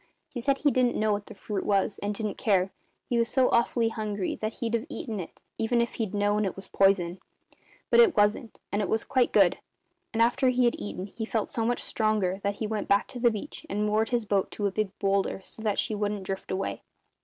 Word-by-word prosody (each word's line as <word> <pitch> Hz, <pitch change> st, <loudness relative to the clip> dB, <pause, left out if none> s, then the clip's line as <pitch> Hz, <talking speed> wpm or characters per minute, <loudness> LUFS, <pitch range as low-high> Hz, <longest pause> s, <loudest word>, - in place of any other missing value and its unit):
He 245 Hz, -, -5 dB
said 275 Hz, +2 st, +2 dB
he 290 Hz, 0 st, +2 dB
didn't 255 Hz, -2 st, +2 dB
know 215 Hz, -1 st, +2 dB
what 205 Hz, 0 st, -4 dB
the -, -, -10 dB
fruit 200 Hz, -1 st, -4 dB
was, 200 Hz, 0 st, +1 dB
and 205 Hz, 0 st, -2 dB
didn't 210 Hz, -1 st, -4 dB
care, 190 Hz, -3 st, +2 dB, 0.4 s
he 240 Hz, -, +1 dB
was 230 Hz, 0 st, +1 dB
so 260 Hz, -2 st, +3 dB
awfully 235 Hz, 0 st, +2 dB
hungry 210 Hz, -4 st, -3 dB
that 215 Hz, +1 st, -3 dB
he'd 230 Hz, -3 st, -3 dB
have 235 Hz, +4 st, 0 dB
eaten 225 Hz, -8 st, -5 dB
it, 170 Hz, -, -9 dB, 0.2 s
even 235 Hz, +2 st, +2 dB
if 235 Hz, 0 st, 0 dB
he'd 210 Hz, -2 st, -2 dB
known 205 Hz, +1 st, +2 dB
it 195 Hz, -, -2 dB
was 195 Hz, 0 st, -9 dB
poison. 190 Hz, -2 st, +2 dB, 0.7 s
But 475 Hz, -, +6 dB
it 450 Hz, -, +6 dB
wasn't; 210 Hz, +2 st, +2 dB, 0.2 s
it 205 Hz, -2 st, 0 dB
was 220 Hz, -, +1 dB
quite 260 Hz, -2 st, +2 dB
good; -, -, +4 dB, 0.5 s
and 225 Hz, -, -3 dB
after 240 Hz, +3 st, +4 dB
he 250 Hz, 0 st, +3 dB
had 240 Hz, -, +3 dB
eaten 190 Hz, -2 st, -5 dB
he 215 Hz, +3 st, -7 dB
felt 220 Hz, -1 st, -2 dB
so 225 Hz, -1 st, -1 dB
much 245 Hz, -, -1 dB
stronger 210 Hz, -4 st, 0 dB
that 200 Hz, 0 st, -1 dB
he 220 Hz, -, -3 dB
went 215 Hz, -1 st, -2 dB
back 200 Hz, 0 st, +3 dB
to 250 Hz, -, -7 dB
the 240 Hz, 0 st, +5 dB
beach 225 Hz, +9 st, -6 dB
and 210 Hz, +1 st, 0 dB
moored 215 Hz, +1 st, +1 dB
his 240 Hz, -3 st, 0 dB
boat 200 Hz, -2 st, +1 dB
to 205 Hz, -, -2 dB
a 200 Hz, -, +1 dB
big 215 Hz, 0 st, -1 dB
boulder, 195 Hz, -1 st, 0 dB
so 220 Hz, -, -12 dB
that 210 Hz, -2 st, 0 dB
she 225 Hz, -, 0 dB
wouldn't 205 Hz, -1 st, -2 dB
drift 190 Hz, 0 st, -5 dB
away. 190 Hz, +1 st, -2 dB
215 Hz, 235 wpm, -28 LUFS, 200-235 Hz, 0.7 s, But